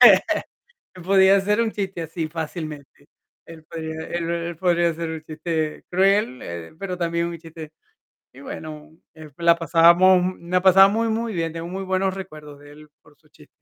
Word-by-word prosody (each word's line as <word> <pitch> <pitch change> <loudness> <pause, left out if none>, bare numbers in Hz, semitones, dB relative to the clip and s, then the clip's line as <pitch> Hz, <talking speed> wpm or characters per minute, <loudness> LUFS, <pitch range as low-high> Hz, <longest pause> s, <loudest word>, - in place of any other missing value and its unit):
Entonces, - - +8 0.7
él 180 - -11
podía 190 +1 +5
hacer 210 +3 +1
un 225 - -1
chiste 190 -4 -4
así, 165 0 -4
fácilmente. 155 -3 -7 0.4
Él 160 -1 -13
podría 160 0 -6
él 170 -1 -3
él 170 0 -3
podría 175 -2 +2
hacer 165 0 -5
un 160 -1 -6
chiste 155 0 -4
cruel, 190 -7 +2
eh, 85 -1 -8
pero 185 -1 -4
también 170 -1 -1
un 170 -1 -6
chiste 160 -1 -11 0.6
y, 135 - -14
bueno, 155 +1 -9 0.2
eh, 155 -1 -12
la 170 0 +4
pasábamos 170 +2 +5
mu 180 -1 -4
la 185 0 +2
pasaba 195 +1 +7
muy 225 +3 0
muy 225 0 -2
bien, 165 -2 -2
tengo 165 0 -6
muy 190 +2 -5
buenos 190 0 0
recuerdos 155 -6 -10
de 145 0 -15
él, 150 +1 -15
por 145 -1 -23
sus 150 0 -30
chis 150 0 -19
170 Hz, 185 wpm, -22 LUFS, 155-185 Hz, 0.7 s, Entonces